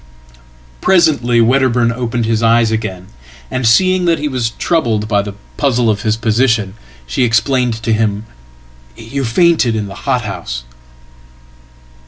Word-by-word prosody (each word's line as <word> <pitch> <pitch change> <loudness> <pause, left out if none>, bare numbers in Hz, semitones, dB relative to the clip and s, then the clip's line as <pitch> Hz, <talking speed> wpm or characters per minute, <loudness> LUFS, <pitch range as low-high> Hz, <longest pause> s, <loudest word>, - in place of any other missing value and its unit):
"Presently 145 -10 +3
Wedderburn 125 -1 +2
opened 120 -1 -2
his 110 0 0
eyes 115 0 +3
again, 95 -5 -4 0.5
and, 130 -2 -1
seeing 185 +9 +3
that 170 -1 +2
he 150 - -3
wastroubled 120 -2 -1
by 100 -2 +1
the 100 0 -7 0.2
puzzle 125 -5 +1
of 105 0 -3
his 110 0 0
position, 115 -2 +1 0.3
she 65 - -3
explained 120 +1 +1
to 115 - +1
him, 105 -1 -1 0.7
"You 135 +5 -5
faintedin 120 - +2
the 100 - -8 0.2
hothouse."" 100 - -3
115 Hz, 125 wpm, -15 LUFS, 110-130 Hz, 0.7 s, Presently